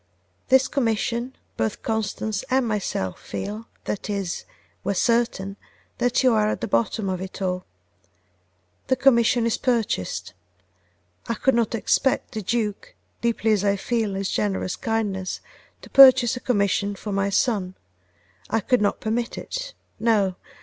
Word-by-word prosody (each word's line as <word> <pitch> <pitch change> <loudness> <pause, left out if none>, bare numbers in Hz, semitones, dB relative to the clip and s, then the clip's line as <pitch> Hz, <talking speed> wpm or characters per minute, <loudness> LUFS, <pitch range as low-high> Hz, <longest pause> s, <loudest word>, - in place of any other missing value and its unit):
This 265 0 +5
commission, 240 0 -1 0.2
both 110 -1 -2
Constance 220 -2 -2
and 260 -1 +2
myself 200 - -2
feel, 210 +3 -5 0.2
that 210 - -4
is, 195 -3 -3 0.4
we 200 - 0
are - - -8
certain, 225 -3 +1 0.4
that 245 +2 +2
you 255 -2 +5
are 215 -1 +3
at - - -3
the - - -2
bottom 215 0 0
of 185 -1 -2
it 190 +1 -7
all. 180 -1 -2 1.2
The 260 - +3
commission 240 -2 +4
is 230 - 0
purchased. 100 - -1 0.9
I 230 - -1
could 265 +4 +2
not 230 -1 +1
expect 260 +4 +1
the 220 - -4
Duke, 210 0 -2 0.3
deeply 230 -1 +1
as 205 -2 +2
I 200 -1 +3
feel 215 0 -1
his 195 0 -2
generous 195 -3 -1
kindness, 210 -6 -2 0.4
to - - -11
purchase 260 -2 +8
a - - -5
commission 200 -4 +1
for 205 +1 -6
my 195 0 +1
son: 195 -3 0 0.7
I 225 - +2
could 245 +3 +1
not 205 - 0
permit 230 +2 -2
it. - - -5 0.2
No! 210 -4 +2
220 Hz, 150 wpm, -24 LUFS, 195-235 Hz, 1.2 s, purchase